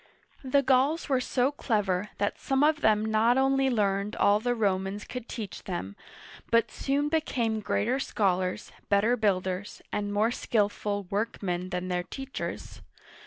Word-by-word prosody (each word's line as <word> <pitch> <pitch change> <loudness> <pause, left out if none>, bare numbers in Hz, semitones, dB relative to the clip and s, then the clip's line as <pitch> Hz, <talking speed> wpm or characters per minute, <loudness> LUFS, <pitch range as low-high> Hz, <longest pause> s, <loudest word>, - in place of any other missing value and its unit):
The 275 +1 +2
Gauls 275 +5 +2
were 260 -2 +2
so 255 +2 +1
clever 210 -8 -1
that 205 0 -1
some 270 +1 +1
of 300 0 +3
them 215 0 +3
not 220 +3 +3
only 270 0 +3
learned 205 -3 0
all 205 +1 +4
the 245 +2 0
Romans 195 -1 -1
could 250 -2 -7
teach 215 -5 -6
them, 135 - -4 0.5
but 230 -1 +3
soon 285 +2 0
became 250 -8 0
greater 235 +5 0
scholars, 185 -7 -1 0.2
better 210 +4 +3
builders, 190 -3 -1
and 205 0 -1
more 215 +3 +2
skillful 205 -3 -1
work 210 +2 -2
men 180 -1 -2
than 180 0 -3
their 180 -1 0
teachers. 270 +8 -6
215 Hz, 150 wpm, -28 LUFS, 200-255 Hz, 0.5 s, all